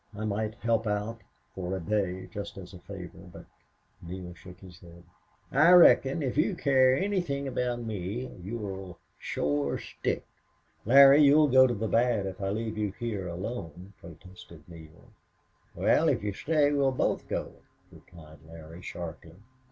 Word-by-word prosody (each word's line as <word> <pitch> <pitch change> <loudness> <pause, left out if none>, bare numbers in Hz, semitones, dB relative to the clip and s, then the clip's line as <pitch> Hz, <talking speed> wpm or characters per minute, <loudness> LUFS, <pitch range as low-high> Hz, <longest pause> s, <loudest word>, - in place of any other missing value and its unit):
I 110 - -4
might 110 +1 -2
help 115 0 -1
out 105 +2 -3 0.3
for 95 0 -4
a - - -4
day 95 0 -2
just 100 -2 -7
as 90 -1 -10
a 90 - -11
favor. 90 -2 -11
But - - -12 0.3
" - - -40
Neale 90 +1 -8
shook 90 +1 -14
his 90 -3 -14
head. 85 -1 -15 0.5
"I 155 +6 +5
reckon, 160 -4 +6
if 130 0 -3
you 180 +5 +1
care 130 -4 +3
anythin' 175 -7 -2
aboot 125 -2 -2
me, 105 +3 -4 0.2
you'll 95 -3 -6 0.2
shore 70 -1 -1
stick." - - -4 0.6
"Larry, 140 +3 +8
you'll 150 +1 +5
go 130 0 +6
to 120 - -2
the 110 +2 -3
bad 115 -3 +1
if 95 0 -7
I 95 - -1
leave 110 +1 -3
you 105 -3 -2
here 105 -5 -4
alone," 90 0 -7
protested 85 -1 -14
Neale. 80 -2 -15 0.6
"Wel, - - +3
if - - 0
you 105 -1 -2
stay 150 +5 +1
we'll 140 -2 +2
both 130 - -1
go," - - -5 0.3
replied 80 -3 -16
Larry, 80 +1 -12
sharply. 85 -2 -8
105 Hz, 160 wpm, -28 LUFS, 90-125 Hz, 0.6 s, Larry